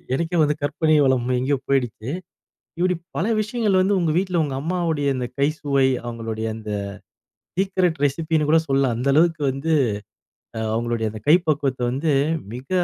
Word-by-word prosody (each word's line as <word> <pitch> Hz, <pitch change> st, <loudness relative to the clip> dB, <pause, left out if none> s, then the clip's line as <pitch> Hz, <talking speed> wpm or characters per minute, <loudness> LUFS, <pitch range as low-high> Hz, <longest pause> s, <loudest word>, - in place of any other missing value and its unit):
எனக்கே 170 Hz, +4 st, -1 dB
வந்து 150 Hz, 0 st, +2 dB
கற்பனை 155 Hz, +2 st, +1 dB
வளம் 130 Hz, -2 st, +2 dB
எங்கேயோ 135 Hz, +3 st, +1 dB
போய்டுச்சு. 125 Hz, -3 st, -1 dB, 0.7 s
இப்புடி 180 Hz, +1 st, +1 dB, 0.2 s
பல -, -, 0 dB, 0.2 s
விஷயங்கள் 215 Hz, -3 st, +1 dB
வந்து 195 Hz, +2 st, +2 dB
உங்க 165 Hz, -3 st, +1 dB
வீட்ல 185 Hz, -2 st, +1 dB
உங்க 140 Hz, -3 st, -3 dB
அம்மாவுடைய 165 Hz, -3 st, -1 dB
இந்த 125 Hz, -1 st, -2 dB
கை 140 Hz, -, +4 dB
சுவை 140 Hz, -2 st, +2 dB, 0.2 s
அவங்களுடைய 115 Hz, -2 st, -4 dB
அந்த 110 Hz, -1 st, -8 dB, 0.9 s
சீக்ரெட் 185 Hz, -4 st, +1 dB
ரெசிபி 160 Hz, +3 st, 0 dB
ன்னு 150 Hz, -1 st, 0 dB
கூட 165 Hz, -, +6 dB
சொல்லலாம். 135 Hz, -3 st, +2 dB
அந்த 125 Hz, +4 st, -1 dB
அளவுக்கு 160 Hz, 0 st, +3 dB
வந்து 135 Hz, +5 st, -2 dB, 1.0 s
அவங்களுடைய 115 Hz, -1 st, -1 dB
அந்த 110 Hz, -, -8 dB
கை 160 Hz, -, +8 dB
பக்குவத்த 140 Hz, -4 st, 0 dB
வந்து 145 Hz, +4 st, 0 dB, 0.4 s
மிக 125 Hz, +2 st, -9 dB
145 Hz, 155 wpm, -22 LUFS, 130-170 Hz, 1.0 s, கை